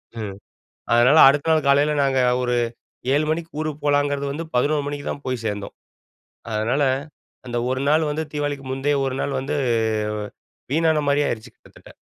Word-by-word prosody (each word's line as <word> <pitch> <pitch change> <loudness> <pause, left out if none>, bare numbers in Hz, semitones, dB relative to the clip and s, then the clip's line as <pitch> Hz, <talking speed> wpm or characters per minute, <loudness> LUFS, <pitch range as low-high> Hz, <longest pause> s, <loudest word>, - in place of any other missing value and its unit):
ம். 105 -4 -5 0.6
அதனால, 125 +6 +5
அடுத்த 140 +3 +3
நாள் 155 -2 +2
காலையில 145 +2 +4
நாங்க 135 -1 +1 0.2
ஒரு 125 -1 0 0.6
7:00 150 +2 +2
மணிக்கு 165 +1 -2
ஊருக்கு 155 -1 -3
போகலாங்கிறது 145 -1 +1
வந்து, 155 +4 -4
11:00 145 +4 +2
மணிக்கு 145 0 -5
தான் 140 - -5
போய் 130 -3 -3
சேர்ந்தோம். 105 -2 -4 0.8
அதனால, 115 +7 0 0.6
அந்த 120 -1 -4
ஒரு 130 +1 -1
நாள் 155 +1 +3
வந்து 155 +2 -2
தீவாளிக்கு 145 -2 -3
முந்தைய 140 +2 0
ஒரு 135 -1 -2
நாள் 140 - -2
வந்து 135 +3 -3 1.2
வீணான 160 0 +3
மாரியே 145 +1 +2
ஆயிருச்சு 110 -1 -5
கிட்டத்தட்ட. - - -18
145 Hz, 155 wpm, -22 LUFS, 130-150 Hz, 1.2 s, அதனால